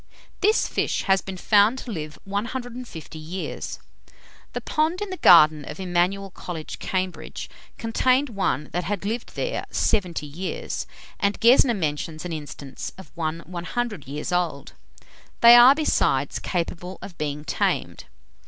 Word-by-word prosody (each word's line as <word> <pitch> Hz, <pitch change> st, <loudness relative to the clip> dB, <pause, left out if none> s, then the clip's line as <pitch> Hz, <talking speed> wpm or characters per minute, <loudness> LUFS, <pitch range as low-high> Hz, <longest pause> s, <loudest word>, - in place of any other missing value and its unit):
This 425 Hz, +3 st, +3 dB
fish -, -, -1 dB
has 195 Hz, -1 st, +3 dB
been 190 Hz, -1 st, -7 dB
found 210 Hz, +5 st, +4 dB
to 255 Hz, -, -6 dB
live 155 Hz, -5 st, -5 dB
150 230 Hz, -, -5 dB
years. 170 Hz, +5 st, -5 dB, 0.8 s
The -, -, -2 dB
pond 320 Hz, +3 st, 0 dB
in 415 Hz, -2 st, -4 dB
the 370 Hz, -, -4 dB
garden 155 Hz, -, +7 dB
of 150 Hz, +4 st, -8 dB
Emmanuel 185 Hz, +2 st, 0 dB
College, 165 Hz, -4 st, -7 dB
Cambridge, 185 Hz, -1 st, -3 dB, 0.3 s
contained 255 Hz, +4 st, +2 dB
one 195 Hz, -8 st, -1 dB
that 180 Hz, +3 st, -1 dB
had 200 Hz, 0 st, -3 dB
lived 230 Hz, +3 st, -4 dB
there -, -, -2 dB
70 180 Hz, -8 st, 0 dB
years, 165 Hz, +6 st, -4 dB, 0.3 s
and 200 Hz, 0 st, 0 dB
Gesner 240 Hz, +1 st, +5 dB
mentions 155 Hz, 0 st, -3 dB
an 175 Hz, -, -4 dB
instance 145 Hz, -3 st, -7 dB
of 190 Hz, -6 st, -12 dB
one 165 Hz, 0 st, -3 dB
100 180 Hz, -, -4 dB
years 145 Hz, +5 st, -4 dB
old. 175 Hz, -5 st, -1 dB, 0.7 s
They 235 Hz, 0 st, +10 dB
are, 245 Hz, +3 st, +9 dB
besides, 310 Hz, 0 st, +1 dB
capable 180 Hz, +1 st, -3 dB
of 185 Hz, -, -9 dB
being 150 Hz, -1 st, -3 dB
tamed. -, -, -1 dB
185 Hz, 140 wpm, -24 LUFS, 160-235 Hz, 0.8 s, They